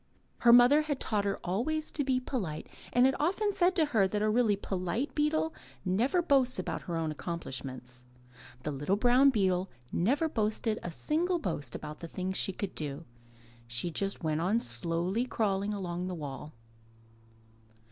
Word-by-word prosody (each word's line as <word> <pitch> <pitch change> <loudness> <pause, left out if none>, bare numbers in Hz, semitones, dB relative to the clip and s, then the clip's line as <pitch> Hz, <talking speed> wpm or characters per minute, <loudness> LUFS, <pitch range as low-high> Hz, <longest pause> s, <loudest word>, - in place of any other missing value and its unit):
Her 235 - +6
mother 245 +5 +7
had 295 -3 -2
taught 205 -2 0
her 200 - 0
always 280 - -1
to 290 - -1
be 260 -1 +1
polite 195 - -4 0.2
and 245 +1 +5
had 265 - +3
often 395 +7 +1
said 365 0 +3
to 320 - +4
her 200 -4 +4
that 210 +2 -1
a 215 - +2
really 225 -2 +3
polite 195 - -2
beetle 315 +1 +1 0.3
never 240 - +2
boasts 270 -5 +3
about 185 - -3
her 170 - -1
own 160 -2 -1
accom 170 +2 -4
plishments. 130 -3 -7 0.6
The 150 - -2
little 145 +7 0
brown 250 +5 +5
beetle 190 -6 +1 0.2
never 275 - +2
boasted 220 -3 -1
a - - -4
single 335 - 0
boast 150 - -3
about 150 0 -7
the 170 - -7
things 185 +3 -3
she 195 - +2
could 190 +1 -5
do. 150 +1 -5 0.6
She 120 +9 0
just 195 +2 -2
went 155 0 0
on 200 +7 +2
slowly 180 +1 -1
crawling 200 -4 0
along 180 -3 -3
the 185 - -3
wall. 150 -1 -7
200 Hz, 170 wpm, -30 LUFS, 170-260 Hz, 0.6 s, mother